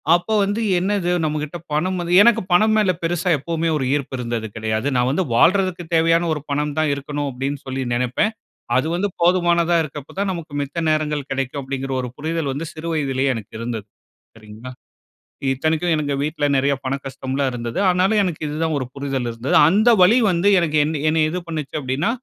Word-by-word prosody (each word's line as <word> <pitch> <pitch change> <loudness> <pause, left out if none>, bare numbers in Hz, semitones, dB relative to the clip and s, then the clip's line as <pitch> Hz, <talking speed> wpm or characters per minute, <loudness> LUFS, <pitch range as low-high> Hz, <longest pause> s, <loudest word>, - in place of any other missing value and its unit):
அப்போ 175 +5 -2
வந்து, 205 +3 -1 0.2
என்னது! 190 -1 0
நம்ம 155 0 -1
கிட்ட 150 +3 -6 0.2
பணம் 185 +5 0
வந்து 175 +1 0
எனக்கு 230 0 +4
பணம் 215 +5 +4
மேலே 200 -4 +3
பெருசா 175 +2 0
எப்பவுமே 165 +3 -2
ஒரு 135 - -2
ஈர்ப்பு 140 -2 -3
இருந்தது 115 -2 -3
கெடையாது. 110 +2 -2
நான் 125 +1 +2
வந்து 180 +6 0
வாழ்றதுக்கு 180 +4 +3
தேவையான 165 +1 +3
ஒரு 150 - -4
பணம் 145 0 -1
தான் 155 -2 +2
இருக்கணும் 145 +1 -4
அப்படின்னு 135 +3 -3
சொல்லி 130 0 -3
நெனப்பேன். 125 - 0 0.4
அது 130 +4 +1
வந்து 190 +4 0
போதுமானதா 170 -1 +3
இருக்கப்ப 150 -2 -9
தான், 200 -1 0
நமக்கு 165 -4 -8
மித்த 140 +5 -5
நேரங்கள் 150 -2 -1
கெடைக்கும் 135 +1 -2
அப்படிங்கிற 135 0 -4
ஒரு 125 - -5
புரிதல் 160 -1 -2
வந்து, 155 +4 -5
சிறு 160 +1 -7
வயதுலயே 135 -3 0
எனக்கு 110 -3 -9
இருந்தது, 115 -3 -5 0.5
சரிங்களா? 110 +3 -11 0.8
இத்தனைக்கும் 155 +5 0
எனக்கு 145 -2 -1
வீட்ல, 150 0 -1
நெறையா 140 +1 +2
பண 130 - -1
கஷ்டம்லாம் 135 0 -2
இருந்தது. 120 -1 -5
ஆனாலும், 185 +4 +2
எனக்கு 175 -5 -3
இதுதான் 155 +2 -1
ஒரு 130 - -3
புரிதல் 135 -3 -3
இருந்தது. 115 +3 -2
அந்த 215 +6 +4
வலி 210 +7 +6
வந்து 175 +2 +1
எனக்கு 155 -3 0
என்ன 155 0 -2
என்னை 160 0 +2
இது 180 +3 -3
பண்ணுச்சு 155 -4 -5
அப்படின்னா, 135 - -1
150 Hz, 180 wpm, -21 LUFS, 135-175 Hz, 0.8 s, வலி